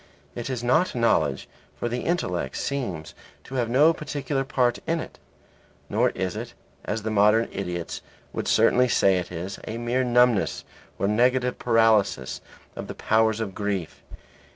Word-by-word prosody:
It 120 - -5
is 125 -2 -3
not 155 +8 +2
knowledge, 115 -1 +1 0.3
for - - -2
the 120 +1 -2
intellect 90 - -2
seems 100 - -3 0.3
to - - -12
have 120 -3 0
no 145 +7 +5
particular 145 -3 -3
part 125 -3 +1
in 165 0 +1
it. - - -8 0.7
Nor - - +2
is 95 0 -2
it 120 +2 -6 0.3
(as 105 0 -3
the 110 - -2
modern 105 +2 +4
idiots 90 -3 -4 0.3
would - - -3
certainly 125 +1 +4
say 95 -5 +3
it 90 - -6
is) 90 +3 -5
a 110 - -4
mere 120 +2 0
numbness 125 -3 +2 0.3
or 100 - 0
negative 125 +3 +2
paralysis 110 - +2 0.3
of - - -6
the - - -7
powers 110 0 +2
of 105 -4 -3
grief. 100 -5 -3
115 Hz, 155 wpm, -25 LUFS, 100-125 Hz, 0.7 s, no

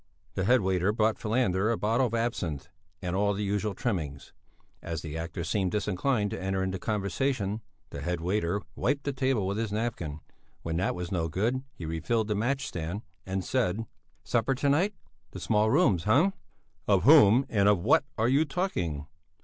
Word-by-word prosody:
The 95 0 -1
head 125 +4 +5
waiter 95 0 +1
brought 110 0 +1
Falander 105 -3 +1
a 115 - 0
bottle 115 +5 +2
of 115 - -3
absinth, 85 - -2 0.3
and 90 0 -2
all 100 +1 +2
the 105 - -2
usual 105 0 -1
trimmings. 80 - -3 0.5
As 80 -1 -5
the 80 -2 -6
actor 85 +1 -4
seemed 95 +2 0
disinclined 105 +1 0
to - - -4
enter 95 0 -1
into 95 0 -2
conversation, 105 +2 -1 0.3
the 70 - -6
head 90 +3 -2
waiter 95 +2 -1
wiped 140 +7 0
the 140 - -2
table 130 -6 +1
with 100 +3 -1
his 115 -2 -2
napkin; 105 -9 -3 0.4
when 80 0 -2
that 95 - 0
was 90 -1 -5
no 85 -3 0
good, 110 +11 0
he 85 - -7
refilled 105 +8 -1
the - - +2
match 130 +6 0
stand, 85 +5 -4 0.2
and 95 -1 -2
said: 115 -4 0 0.4
"Supper 125 +3 +1
to 140 +2 +1
night, 180 +9 +2 0.4
the - - -6
small 110 0 +2
rooms! 110 - +3
Hm!" 145 - +4 0.5
"Of 100 -3 +3
whom 130 -2 +7
and 100 -2 +3
of 105 - +5
what 105 +10 +3
are 110 +1 +2
you 140 +5 +4
talking?" 90 - -2
105 Hz, 180 wpm, -28 LUFS, 90-120 Hz, 0.5 s, whom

